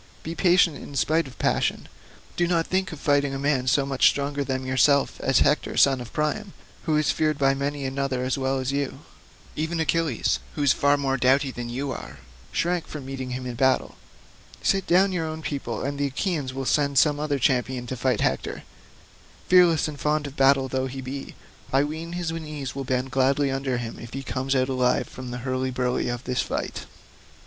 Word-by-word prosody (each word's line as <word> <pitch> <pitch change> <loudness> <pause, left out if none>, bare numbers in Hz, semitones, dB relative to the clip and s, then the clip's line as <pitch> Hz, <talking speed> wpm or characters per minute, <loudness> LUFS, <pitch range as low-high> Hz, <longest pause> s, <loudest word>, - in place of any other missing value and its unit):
Be 165 - -4
patient 175 -2 +3
in 140 - -10
spite 160 +2 +2
of 130 - -13
passion, - - 0 0.5
do 175 - +1
not 170 -2 +1
think 185 0 -1
of 160 - -8
fighting 145 -1 +1
a - - -2
man 135 -2 0
so 135 +2 +3
much 135 -1 +3
stronger 140 0 -2
than 130 -1 -3
yourself 135 +2 +3
as 135 - +3
Hector 150 - +1
son 135 -2 +5
of 120 - -9
Priam, 190 +7 -2 0.3
who 155 -2 +2
is 150 -2 +2
feared 155 -2 0
by 135 -1 +3
many 140 0 -3
another 135 -1 -1
as 130 0 0
well 135 0 0
as 130 0 -2
you. 140 0 -2 0.5
Even 160 +2 -2
Achilles, 160 -4 +1 0.2
who 145 - -1
is 140 - +5
far 145 0 +3
more 135 -1 0
doughty 135 +2 +3
than 120 -1 -6
you 135 +3 -3
are, - - -7 0.3
shrank 175 0 0
from 145 -4 -7
meeting 130 -1 -5
him 125 0 -4
in 125 - -4
battle. 130 +2 +1 0.7
Sit 195 -1 +1
down 190 +3 +4
your 170 -3 -1
own 160 0 -6
people, 130 -7 -3
and 140 +1 -3
the 145 - +1
Achaeans 145 -1 -2
will 135 +1 -4
send 140 0 +1
some 145 0 +4
other 150 -1 0
champion 125 -1 0
to 130 - -4
fight 125 -2 0
Hector; - - -1 0.9
fearless 175 -4 +5
and 150 -2 -7
fond 150 0 0
of 140 -1 -7
battle 135 -1 +4
though 130 0 -1
he 135 +1 -6
be, 135 +2 -7 0.4
I 135 +1 +4
ween 160 +3 -5
his 175 -2 -2
knees 150 -4 -5
will 135 -1 -5
bend 130 +1 -1
gladly 135 +1 +2
under 135 -1 -1
him 120 -2 -5
if 120 - -10
he 135 +1 -4
comes 135 +1 -2
out 130 -1 +2
alive 130 -2 +1
from 130 -1 -8
the 125 +1 -6
hurly 130 0 -1
burly 125 -1 -1
of 120 +1 -4
this 125 -1 0
fight." - - -4
140 Hz, 205 wpm, -25 LUFS, 130-150 Hz, 0.9 s, son